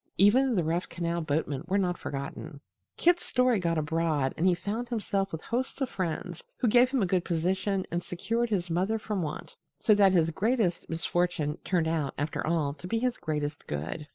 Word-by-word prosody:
Even 245 Hz, +6 st, +5 dB
the 180 Hz, -, +2 dB
rough 170 Hz, +3 st, -1 dB
canal 170 Hz, 0 st, -2 dB
boatmen 150 Hz, -2 st, -1 dB
were 190 Hz, +2 st, +1 dB
not 180 Hz, -3 st, +1 dB
forgotten. 140 Hz, -1 st, -6 dB, 0.4 s
Kit's 350 Hz, +1 st, +3 dB
story 250 Hz, -4 st, +2 dB
got 170 Hz, -2 st, 0 dB
abroad 155 Hz, -3 st, 0 dB
and 175 Hz, -, +1 dB
he 180 Hz, -, +4 dB
found 215 Hz, +7 st, -4 dB
himself 200 Hz, -4 st, -1 dB
with 160 Hz, -, -6 dB
hosts 250 Hz, +3 st, -2 dB
of 270 Hz, -3 st, -1 dB
friends, 175 Hz, -1 st, -4 dB
who 245 Hz, -, +1 dB
gave 245 Hz, +3 st, +5 dB
him 260 Hz, -5 st, +1 dB
a -, -, +3 dB
good 180 Hz, -1 st, +1 dB
position 185 Hz, +3 st, 0 dB
and 175 Hz, +1 st, -1 dB
secured 230 Hz, +7 st, -2 dB
his 190 Hz, -5 st, 0 dB
mother 190 Hz, +6 st, +1 dB
from 210 Hz, -3 st, -3 dB
want. 155 Hz, -2 st, -5 dB, 0.2 s
So 215 Hz, -, +4 dB
that 200 Hz, -2 st, +5 dB
his 165 Hz, -2 st, +3 dB
greatest 210 Hz, -1 st, 0 dB
misfortune 165 Hz, -2 st, 0 dB
turned 170 Hz, -4 st, +1 dB
out, 160 Hz, -4 st, -1 dB
after 145 Hz, +3 st, -2 dB
all, 155 Hz, -4 st, +1 dB
to 180 Hz, -, -7 dB
be 225 Hz, -, 0 dB
his 250 Hz, +1 st, 0 dB
greatest 150 Hz, -2 st, -3 dB
good. 80 Hz, -, -4 dB
180 Hz, 195 wpm, -29 LUFS, 160-210 Hz, 0.4 s, Even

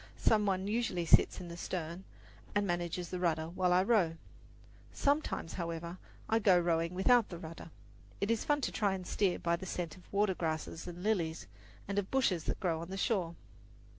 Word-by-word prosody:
Some 210 Hz, -2 st, +3 dB
one 190 Hz, 0 st, 0 dB
usually 210 Hz, -6 st, 0 dB
sits -, -, +5 dB
in 180 Hz, -, -7 dB
the 170 Hz, -, -7 dB
stern 170 Hz, +1 st, -4 dB, 0.5 s
and 205 Hz, 0 st, +2 dB
manages 175 Hz, -1 st, -2 dB
the 180 Hz, -, -3 dB
rudder 160 Hz, -2 st, 0 dB
while 180 Hz, +1 st, +1 dB
I 180 Hz, +1 st, +5 dB
row. 195 Hz, -7 st, +3 dB, 0.8 s
Sometimes, 285 Hz, -, 0 dB
however, 170 Hz, +1 st, -4 dB, 0.3 s
I 225 Hz, -, +3 dB
go 195 Hz, -4 st, +5 dB
rowing 170 Hz, 0 st, 0 dB
without 235 Hz, +4 st, +4 dB
the 175 Hz, -, -6 dB
rudder. 165 Hz, 0 st, -9 dB, 0.5 s
It 200 Hz, +3 st, +1 dB
is 230 Hz, -, +1 dB
fun 290 Hz, -1 st, +1 dB
to -, -, -1 dB
try 200 Hz, -3 st, +1 dB
to 185 Hz, -, -8 dB
steer 185 Hz, -1 st, +1 dB
by 170 Hz, 0 st, 0 dB
the 190 Hz, +2 st, -8 dB
scent 170 Hz, -3 st, -3 dB
of 180 Hz, -, -19 dB
watergrasses 175 Hz, -6 st, -1 dB
and 175 Hz, 0 st, -7 dB
lilies, 170 Hz, -7 st, 0 dB, 0.4 s
and 200 Hz, +1 st, 0 dB
of 195 Hz, -, -4 dB
bushes 210 Hz, -11 st, +1 dB
that -, -, -2 dB
grow 165 Hz, -3 st, 0 dB
on 170 Hz, -, -7 dB
the 195 Hz, -, -4 dB
shore. 185 Hz, -6 st, 0 dB
180 Hz, 190 wpm, -33 LUFS, 170-200 Hz, 0.8 s, sits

